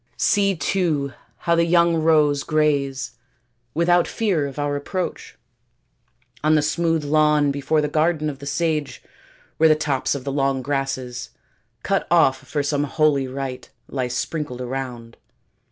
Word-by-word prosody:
See, 200 Hz, -1 st, +2 dB
too, 150 Hz, -4 st, 0 dB, 0.3 s
how 170 Hz, -, +3 dB
the 170 Hz, 0 st, +3 dB
young 170 Hz, 0 st, +4 dB
roes 155 Hz, -3 st, +3 dB
graze, 145 Hz, -3 st, 0 dB, 0.6 s
without 175 Hz, +1 st, +3 dB
fear 185 Hz, -10 st, 0 dB
of 140 Hz, -, -9 dB
our 145 Hz, 0 st, -1 dB
approach, 180 Hz, +6 st, -4 dB, 1.1 s
on 155 Hz, +1 st, +4 dB
the 150 Hz, -, +3 dB
smooth 165 Hz, 0 st, 0 dB
lawn 150 Hz, -1 st, +3 dB
before 145 Hz, +2 st, 0 dB
the 150 Hz, -, 0 dB
garden 155 Hz, +1 st, +1 dB
of 140 Hz, -3 st, -5 dB
the 140 Hz, -, -8 dB
sage, 150 Hz, 0 st, -1 dB, 0.5 s
where 160 Hz, 0 st, +5 dB
the 155 Hz, -, +6 dB
tops 145 Hz, -3 st, -1 dB
of 135 Hz, -, -5 dB
the 140 Hz, -, -3 dB
long 135 Hz, -1 st, 0 dB
grasses, 130 Hz, -3 st, -3 dB, 0.5 s
cut 195 Hz, -, 0 dB
off 160 Hz, -6 st, +4 dB
for 145 Hz, -2 st, -3 dB
some 145 Hz, 0 st, 0 dB
holy 145 Hz, -2 st, +1 dB
rite, 130 Hz, -1 st, -6 dB, 0.2 s
lie 130 Hz, -2 st, -2 dB
sprinkled 125 Hz, +1 st, -3 dB
around. 125 Hz, -2 st, -6 dB
145 Hz, 145 wpm, -22 LUFS, 135-160 Hz, 1.1 s, the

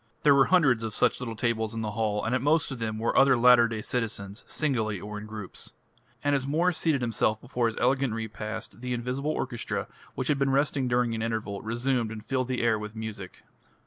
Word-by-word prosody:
There 145 Hz, -, +7 dB
were 135 Hz, -1 st, +6 dB
hundreds 145 Hz, -11 st, +4 dB
of 110 Hz, -2 st, -4 dB
such -, -, +2 dB
little 115 Hz, -2 st, -4 dB
tables 110 Hz, -1 st, -1 dB
in 115 Hz, -, -2 dB
the 105 Hz, -1 st, -2 dB
hall, 105 Hz, -1 st, -1 dB
and 115 Hz, -, 0 dB
at 130 Hz, -, +1 dB
most 150 Hz, +2 st, +2 dB
of 130 Hz, -, -5 dB
them 110 Hz, -1 st, -2 dB
were 115 Hz, +1 st, -1 dB
other 135 Hz, -2 st, +6 dB
latter 120 Hz, 0 st, +7 dB
day 110 Hz, -2 st, -4 dB
citizens 105 Hz, -4 st, -3 dB
singly 110 Hz, -, -1 dB
or 105 Hz, +2 st, -6 dB
in 105 Hz, -, -9 dB
groups. 105 Hz, -3 st, -8 dB, 0.5 s
And 145 Hz, 0 st, +2 dB
as 135 Hz, -1 st, 0 dB
Mwres 170 Hz, +5 st, +2 dB
seated 155 Hz, -5 st, +1 dB
himself 110 Hz, -2 st, +1 dB
before 120 Hz, -1 st, -1 dB
his 115 Hz, -, -4 dB
elegant 130 Hz, -2 st, +1 dB
repast, 110 Hz, 0 st, -6 dB
the 125 Hz, 0 st, -2 dB
invisible 125 Hz, +5 st, -2 dB
orchestra, 130 Hz, -6 st, -3 dB, 0.3 s
which 130 Hz, -, -2 dB
had 145 Hz, -2 st, +2 dB
been 140 Hz, 0 st, +2 dB
resting 135 Hz, -1 st, +1 dB
during 120 Hz, -1 st, +1 dB
an 110 Hz, -, -3 dB
interval, 110 Hz, -3 st, -3 dB
resumed 120 Hz, +1 st, 0 dB
and 110 Hz, -1 st, -8 dB
filled 130 Hz, 0 st, -1 dB
the 125 Hz, -2 st, -1 dB
air 110 Hz, -2 st, +2 dB
with 105 Hz, +1 st, -7 dB
music. 110 Hz, -4 st, -7 dB
115 Hz, 215 wpm, -27 LUFS, 110-135 Hz, 0.5 s, There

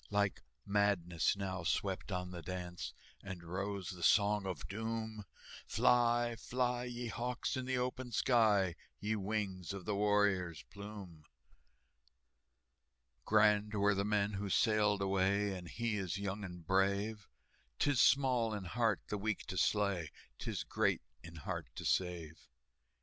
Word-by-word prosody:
Like 100 Hz, -2 st, +1 dB, 0.2 s
madness 100 Hz, -3 st, +2 dB
now 95 Hz, -3 st, -3 dB
swept 95 Hz, +3 st, -1 dB
on 90 Hz, -1 st, -3 dB
the 85 Hz, -1 st, -6 dB
dance, 90 Hz, 0 st, -5 dB, 0.3 s
And 95 Hz, -3 st, -7 dB
rose 95 Hz, +1 st, -3 dB
the 90 Hz, -2 st, -9 dB
Song 100 Hz, +3 st, +4 dB
of 95 Hz, -, -4 dB
Doom, 110 Hz, 0 st, -4 dB, 0.4 s
"Fly, 120 Hz, -1 st, +3 dB
fly, 125 Hz, +1 st, -1 dB
ye 120 Hz, 0 st, -5 dB
hawks, 125 Hz, +5 st, -2 dB
in 130 Hz, -1 st, -3 dB
the 130 Hz, 0 st, 0 dB
open 125 Hz, 0 st, -2 dB
sky, 105 Hz, -7 st, +3 dB, 0.2 s
Ye 110 Hz, +1 st, -1 dB
wings 100 Hz, -3 st, -2 dB
of 100 Hz, -2 st, -7 dB
the 105 Hz, -, 0 dB
warrior's 100 Hz, -5 st, +2 dB
plume!" 100 Hz, -6 st, -9 dB, 2.0 s
"Grand 105 Hz, 0 st, +4 dB
were 100 Hz, 0 st, +4 dB
the 100 Hz, 0 st, 0 dB
men 105 Hz, 0 st, +1 dB
who 100 Hz, 0 st, -3 dB
sailed 105 Hz, -1 st, +3 dB
away, 95 Hz, +1 st, +2 dB
And 90 Hz, -2 st, -7 dB
he 115 Hz, +3 st, -1 dB
is 95 Hz, -2 st, -2 dB
young 100 Hz, +1 st, -3 dB
and 90 Hz, -3 st, -8 dB
brave; 100 Hz, +3 st, +1 dB, 0.5 s
'Tis 145 Hz, -4 st, +3 dB
small 125 Hz, -5 st, +4 dB
in 100 Hz, -, -4 dB
heart 110 Hz, +3 st, +1 dB
the 105 Hz, -, -2 dB
weak 110 Hz, 0 st, -2 dB
to -, -, -5 dB
slay, 100 Hz, -5 st, +1 dB, 0.3 s
'Tis -, -, -3 dB
great -, -, +1 dB, 0.2 s
in 85 Hz, 0 st, -10 dB
heart 80 Hz, -, -4 dB
to -, -, -6 dB
save." 85 Hz, -4 st, -1 dB
100 Hz, 140 wpm, -35 LUFS, 95-110 Hz, 2.0 s, Song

